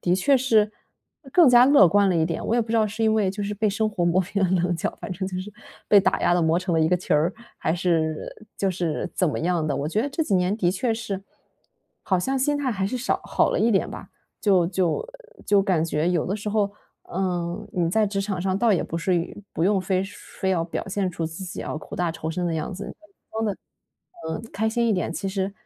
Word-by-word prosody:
的 175 - +2
确 275 +9 +3
是 220 -5 +3 0.6
更 345 -1 +6
加 245 0 +7
乐 280 -9 +7
观 200 +3 +4
了 180 - +2
一 160 - +3
点。 165 -1 -3
我 230 - +1
也 240 - +3
不 220 - -4
知 - - 0
道 220 -1 +3
是 220 +2 -4
因 220 -1 +4
为， 205 -4 +2
就 205 +1 -5
是， 200 - -2
被 215 +1 +1
生 215 +2 0
活 205 -4 -3
磨 175 +2 +2
平 195 +2 -2
了 185 - +2
棱 175 0 +1
角， 165 - -3
反 185 - -5
正 190 +1 -4
就 185 -1 -4
是 205 +3 -8 0.4
被 205 - +7
打 - - +1
压 - - +3
了 175 - +3
磨 165 +1 +2
成 180 -2 -2
了 160 - +3
一 155 - +3
个 180 - +3
球 180 - -1
儿， 155 +4 +3 0.3
还 160 - 0
是 165 -3 -1 0.2
就 195 -1 0
是 175 -1 -2
怎 180 - +2
么 - - -2
样 170 -1 0
的。 145 -3 -1
我 140 +2 -2
觉 205 +7 0
得 285 - -1
这 320 +4 -1
几 205 -10 0
年 185 +3 +2
的 180 -5 +2
确 225 +4 0
是， 200 -4 -4 0.8
好 185 -2 +1
像 265 +9 -1
心 290 +3 +1
态 275 -3 -1
还 195 -1 -1
是 255 - -2
少 255 +3 -1
好 - - +2
了 - - 0
一 230 - +3
点 195 - +1
吧。 - - -9 0.3
就 190 -5 +3
就 180 - 0 0.4
就 200 -1 +4
感 175 -5 +1
觉 160 +1 0
有 175 -3 +1
的 195 +4 -2
时 210 0 -5
候， 205 -1 +1 0.4
嗯， 180 +1 -2
你 170 -3 0
在 215 +2 +3
职 195 0 -2
场 195 -2 -2
上 190 +1 0
倒 225 0 +3
也 180 - +2
不 165 - -5
是 180 +2 +1
于 170 0 -3 0.2
不 165 - 0
用 195 0 +3
非 185 0 0
说 200 - -10 0.2
非 190 - +1
要 175 -3 +1
表 165 - -4
现 190 -1 -1
出 165 -1 -3
自 165 +4 -7
己 180 - -6
要 - - -4
苦 155 - -8
大 175 -2 0
仇 160 0 -4
深 175 +2 -2
的 165 - -1
样 160 +5 -3
子。 195 +3 -6
嗯， - - -8 0.4
装 220 0 -1
得， 205 -3 -1 0.7
嗯， 160 +6 -4
开 220 +2 0
心 235 +1 +1
一 220 - +3
点， 180 -3 -1
其 195 +2 -3
实 195 0 -2
190 Hz, 285 characters per minute, -24 LUFS, 175-210 Hz, 0.8 s, 加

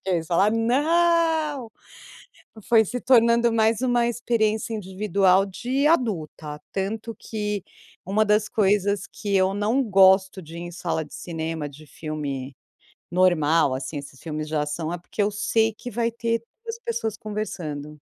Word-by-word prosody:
quê" 190 - -2
e - - -4
você - - -13
fala: 185 +5 +3
"Não!". 305 +3 +2 1.0
Foi 225 -2 +6
se 245 +5 -4
tornando 235 -2 +4
mais 225 0 +2
uma 245 -2 +2
experiência 225 -2 0
individual 195 -1 +2
de 255 +8 -1
adulta. 165 - -1
Tanto 220 +4 -3
que 210 -3 -3 0.4
uma 205 +4 +2
das 210 0 +2
coisas 200 -1 +1
que 205 -2 -4
eu 190 0 +2
não 215 +6 +1
gosto 190 -3 +4
de 165 0 -12
ir - - -6
em 175 - -6
sala 165 -2 -2
de - - -14
cinema 160 -3 -4
de 150 +2 -14
filme 140 -4 -5 0.6
normal, 165 -5 +3
assim, 135 +3 -4
esses 140 -2 -11
filmes 155 -1 -5
de 155 - -2
ação, 150 +2 -2
é 175 - -3
porque 180 +4 -3
eu 205 - +2
sei 220 +2 +1
que 245 +3 -8
vai 230 +1 0
ter 230 0 -1 0.2
2 460 0 -5
pessoas 225 - -3
conversando. 165 -9 -5
205 Hz, 155 wpm, -24 LUFS, 165-230 Hz, 1.0 s, Foi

